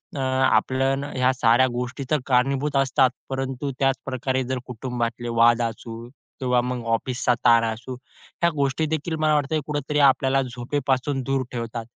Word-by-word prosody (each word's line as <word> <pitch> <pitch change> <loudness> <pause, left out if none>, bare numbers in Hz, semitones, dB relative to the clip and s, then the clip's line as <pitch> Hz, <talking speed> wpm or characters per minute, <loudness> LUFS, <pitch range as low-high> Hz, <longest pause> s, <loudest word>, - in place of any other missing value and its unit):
अ, - - -4
आपल्या 130 0 +2
ना, 140 +1 -5
ह्या 130 0 +2
साऱ्या 125 0 +4
गोष्टी 125 +2 -4
तर 155 - +3
कारणीभूत 135 +3 +1
असतात, 135 -1 +3 0.2
परंतु 135 +1 -3
त्याच 135 -1 +3
प्रकारे 130 0 -1
जर 130 +1 -3
कुटुंबातले 120 -1 -4
वाद 120 0 +5
असू 115 0 -5 0.3
किंवा 125 -1 +2
मग 125 -1 -4
ऑफिसचा 125 +2 0
ताण 115 -1 +6
असू. 120 +3 -8 0.5
ह्या 170 - +4
गोष्टी 140 +2 0
देखील 160 +1 -2
मला 155 0 +3
वाटत 145 0 0
कुठेतरी 150 0 -1
आपल्याला 135 -1 +4
झोपेपासून 130 +2 -2
दूर 135 0 0
ठेवतात. 115 -1 -5
130 Hz, 155 wpm, -23 LUFS, 120-135 Hz, 0.5 s, ताण